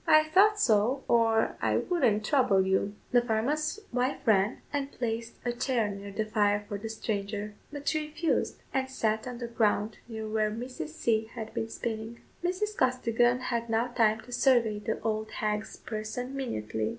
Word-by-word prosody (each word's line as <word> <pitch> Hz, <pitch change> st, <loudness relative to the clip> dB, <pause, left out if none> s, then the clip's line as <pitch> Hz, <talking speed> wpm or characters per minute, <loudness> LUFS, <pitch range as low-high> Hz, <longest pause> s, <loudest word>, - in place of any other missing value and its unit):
"I 310 Hz, 0 st, +7 dB
thought 415 Hz, +5 st, +5 dB
so, 235 Hz, -, +3 dB
or 225 Hz, -1 st, +3 dB
I -, -, +2 dB
wouldn't 240 Hz, -, +1 dB
trouble 230 Hz, -10 st, +3 dB
you." 190 Hz, +2 st, +1 dB, 0.2 s
The 245 Hz, -, +5 dB
farmer's 270 Hz, -, 0 dB
wife 255 Hz, +2 st, +1 dB
ran, 210 Hz, -1 st, +3 dB
and 280 Hz, -1 st, -1 dB
placed 230 Hz, -1 st, -3 dB
a 240 Hz, -, +1 dB
chair 240 Hz, -3 st, 0 dB
near 200 Hz, 0 st, -7 dB
the 215 Hz, +2 st, -1 dB
fire 205 Hz, -1 st, +1 dB
for 205 Hz, -2 st, -4 dB
the 225 Hz, +2 st, -5 dB
stranger; 210 Hz, -1 st, -3 dB, 0.2 s
but 290 Hz, -1 st, -7 dB
she 310 Hz, -1 st, +1 dB
refused, 315 Hz, +2 st, -1 dB
and 265 Hz, 0 st, 0 dB
sat 220 Hz, -3 st, 0 dB
on 250 Hz, -1 st, -5 dB
the 240 Hz, -1 st, -4 dB
ground 215 Hz, -2 st, +1 dB
near 220 Hz, -2 st, -5 dB
where 215 Hz, 0 st, +1 dB
Mrs. 230 Hz, -6 st, -5 dB
C. 220 Hz, +8 st, 0 dB
had 220 Hz, -1 st, -8 dB
been 225 Hz, -, -2 dB
spinning. 225 Hz, 0 st, -4 dB, 0.2 s
Mrs. 375 Hz, +4 st, -1 dB
Costigan 245 Hz, -, +2 dB
had 235 Hz, 0 st, -1 dB
now 225 Hz, +2 st, +1 dB
time 220 Hz, -2 st, +2 dB
to 245 Hz, -, -14 dB
survey 240 Hz, -5 st, +3 dB
the 220 Hz, +1 st, -2 dB
old 215 Hz, 0 st, -1 dB
hag's 210 Hz, 0 st, -2 dB
person 225 Hz, +4 st, -5 dB
minutely. 110 Hz, -, -2 dB
225 Hz, 175 wpm, -29 LUFS, 215-255 Hz, 0.2 s, I